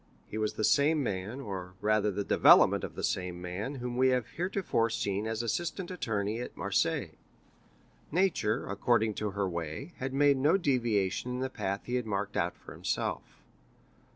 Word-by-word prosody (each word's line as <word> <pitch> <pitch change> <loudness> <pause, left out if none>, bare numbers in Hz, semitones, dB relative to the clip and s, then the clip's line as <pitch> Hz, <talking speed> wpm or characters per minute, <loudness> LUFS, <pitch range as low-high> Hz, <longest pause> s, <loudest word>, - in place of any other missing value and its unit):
He 110 - -5
was 105 -1 0
the - - -3
same 150 +5 +4
man, 105 +3 -3
or 95 -6 -6
rather 105 0 +2
the 100 +1 -2
development - - +6
of - - -5
the - - -5
same 90 -1 -1
man, 90 +10 -4
whom 125 -1 -4
we 130 +1 +4
have 125 -3 +2
heretofore 180 - 0
seen 105 -2 -1
as 110 +1 -2
assistant 175 - -2
attorney 110 - -2
at 125 - -7
Marseilles. - - 0 0.9
Nature, 160 - +1
according 110 +2 +1
to 105 +1 -2
her 100 0 -1
way, 85 - -5
had 130 +1 -3
made 140 0 +4
no 150 +8 +4
deviation 120 - 0
in 125 - -3
the 130 0 -2
path 100 -4 -2
he 125 +1 -1
had 125 -3 -3
marked 100 0 -2
out 85 +1 0
for - - -11
himself. - - -2
110 Hz, 175 wpm, -30 LUFS, 100-130 Hz, 0.9 s, development